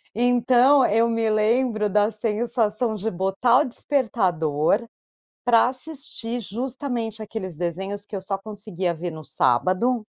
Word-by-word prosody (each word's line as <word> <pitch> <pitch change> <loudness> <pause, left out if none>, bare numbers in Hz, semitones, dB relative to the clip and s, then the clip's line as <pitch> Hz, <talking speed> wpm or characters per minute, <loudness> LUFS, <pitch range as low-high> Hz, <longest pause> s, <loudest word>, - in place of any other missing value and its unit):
Então 245 +3 +4
eu 230 +2 +2
me 230 -1 0
lembro 215 0 +1
da 210 +2 +2
sensação 220 +1 -1
de 215 +2 -2
botar 195 +7 +2
o - - 0
despertador, 200 - 0 0.6
pra 240 0 +5
assistir 255 -3 -4
justamente 235 0 -4
aqueles 190 -6 -6
desenhos 190 +4 -4
que 205 - -11
eu 195 - -3
só 195 +1 -3
conseguia 195 -4 -4
ver 175 +2 -5
no 155 -1 -9
sábado, 185 - +1
220 Hz, 130 wpm, -23 LUFS, 195-245 Hz, 0.6 s, pra